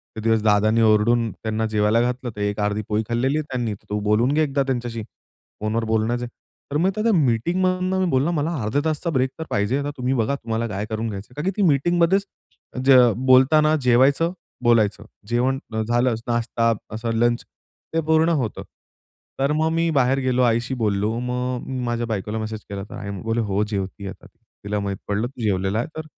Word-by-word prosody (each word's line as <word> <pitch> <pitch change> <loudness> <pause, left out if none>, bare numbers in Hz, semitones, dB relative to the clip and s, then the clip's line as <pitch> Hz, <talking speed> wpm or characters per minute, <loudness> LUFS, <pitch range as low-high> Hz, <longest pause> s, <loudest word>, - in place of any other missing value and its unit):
ते 110 - -5
दिवस 115 -1 +2
दादांनी 110 +2 +3
ओरडून 110 +1 +3
त्यांना 110 0 -3
जेवायला 110 +1 +2
घातलं 125 +1 -2
तर 105 - -6
एक 105 +1 -1
अर्धी 105 +1 0
पोळी 105 +1 +1
खाल्लेली 130 +5 +1
आहे 155 - -1
त्यांनी 120 -4 -1 0.2
तू 105 0 -1
बोलून 105 +6 +2
घे 155 - +2
एकदा 140 -1 0
त्यांच्याशी 120 -4 -3 0.6
फोनवर 110 +2 -1
बोलण्याचे 110 +2 0 0.5
तर 145 - +1
मग 175 +5 +2
त्या 220 +1 +1
मीटिंग 155 - +1
मधून 185 0 +1
मी - - +2
बोलला 140 +5 +2
मला 160 +1 -1
अर्ध्या 115 +7 0
तासचा 160 +2 -1
ब्रेक 130 -2 +1
तर 160 - -2
पाहिजे 105 +6 0
आता 145 - -3
तुम्ही 125 +1 0
बघा 130 +2 0
तुम्हाला 115 -2 -3
काय 105 0 -3
करून 110 +1 -2
घ्यायचं 100 0 -7
आहे. - - -19
कारण 150 +4 -4
की 190 - +2
ती - - +4
मीटिंगमध्येच 175 +6 +2 0.6
ज 135 - +6 0.3
बोलताना 150 +4 +5
जेवायचं 135 +7 +3 0.3
बोलायचं 110 -3 +2 0.2
जेवण 130 +3 +1 0.3
झालं 120 0 +2
नाश्ता 115 -1 +1 0.2
असं 115 +1 -3
लंच 120 +1 +1 0.5
ते 165 - +2
पूर्ण 160 +1 +4
होतं. 115 -5 -3 0.8
तर 135 +2 +2
मग 160 +1 +2
मी 165 0 +1
बाहेर 135 -1 +2
गेलो 130 -1 +1
आईशी 120 +2 +1
बोललो 105 +1 +1
मग 125 0 -2
मी 130 -1 -4
माझ्या 120 0 -1
बायकोला 105 0 -3
मेसेज 110 0 -4
केला 100 -1 -5
तर - - -8
आई 100 - -6
बोले 115 +1 0
हो 100 +2 +1
जेवती 100 -2 -4
आता. - - -10
तिला 105 0 -7
माहीत 100 -1 -3
पडलं 105 +3 0
तू 125 -1 -11
जेवलेला 100 0 0
आहे - - -2
तर 155 - -5
120 Hz, 190 wpm, -22 LUFS, 110-135 Hz, 0.8 s, ज